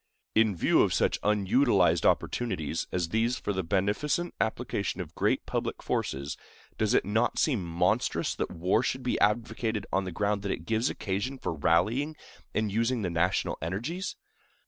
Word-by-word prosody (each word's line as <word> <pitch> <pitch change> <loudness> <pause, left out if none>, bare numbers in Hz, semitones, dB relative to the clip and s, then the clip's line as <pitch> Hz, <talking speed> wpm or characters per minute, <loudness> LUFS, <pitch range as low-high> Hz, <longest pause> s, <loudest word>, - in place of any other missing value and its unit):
In 110 -3 +3
view 85 - +3
of - - +2
such - - +1
unutilized 100 - +3
opportunities 90 -10 0
as 85 -3 -1
these 115 +5 +1
for 105 - -2
the 95 - -1
beneficent 105 - 0
application 110 -4 -2
of 85 -3 -6
great - - +1
public - - -3
forces, 70 +2 -2 0.4
does 110 -1 +1
it - - +3
not 110 +5 +1
seem 125 - +2
monstrous 85 0 0
that - - -3
war 90 +6 +1
should 130 +1 -2
be 125 - 0
advocated 110 -1 0
on 95 0 +1
the 95 - -4
ground 100 +3 0
that 100 -1 -2
it 80 - -4
gives 115 +5 +1
occasion 105 +7 -3
for 105 - -3
rallying 110 - +1 0.4
and 110 -1 0
using 115 +2 0
the 90 - -1
national 90 +3 0
energies? 120 - -3
105 Hz, 165 wpm, -29 LUFS, 90-120 Hz, 0.4 s, In